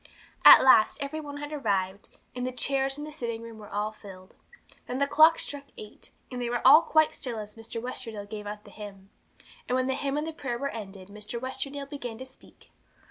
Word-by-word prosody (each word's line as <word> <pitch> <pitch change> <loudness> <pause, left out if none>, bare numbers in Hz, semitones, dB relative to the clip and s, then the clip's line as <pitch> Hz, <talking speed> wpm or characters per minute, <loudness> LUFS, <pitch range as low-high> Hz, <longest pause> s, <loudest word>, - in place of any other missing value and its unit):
At - - +11
last 240 -5 +6
every 280 +2 -4
one 290 -1 -8
had 290 +1 -6
arrived, 200 -7 -2 0.3
and 250 0 -2
the - - -2
chairs 270 +1 -1
in 295 - -6
the 305 - -7
sitting 235 -6 -5
room 230 -1 -10
were 210 - -11
all 210 +1 -2
filled. 190 -3 -13 0.5
Then 250 - -3
the 280 - +2
clock 315 +3 +6
struck 285 -1 -5
eight, 210 0 -11 0.2
and 250 -1 -4
they 240 - -2
were 240 +1 -2
all 290 +5 +9
quite 315 -2 +3
still 245 -4 -5
as 210 -1 -7
Mr. 225 0 -6
Westerdale 225 -4 -6
gave 210 -1 -7
out 210 0 -7
the - - -15
hymn. 200 -2 -11 0.6
And 250 - +1
when 255 0 +1
the 265 - 0
hymn 280 +1 -2
and 300 - -1
the 320 - -5
prayer 265 -6 -4
were 280 +3 -2
ended, 195 -5 -9
Mr. 210 +3 -6
Westerdale 270 +2 -5
began 250 -6 -6
to 260 - -8
speak. 260 0 -18
245 Hz, 220 wpm, -28 LUFS, 210-280 Hz, 0.6 s, At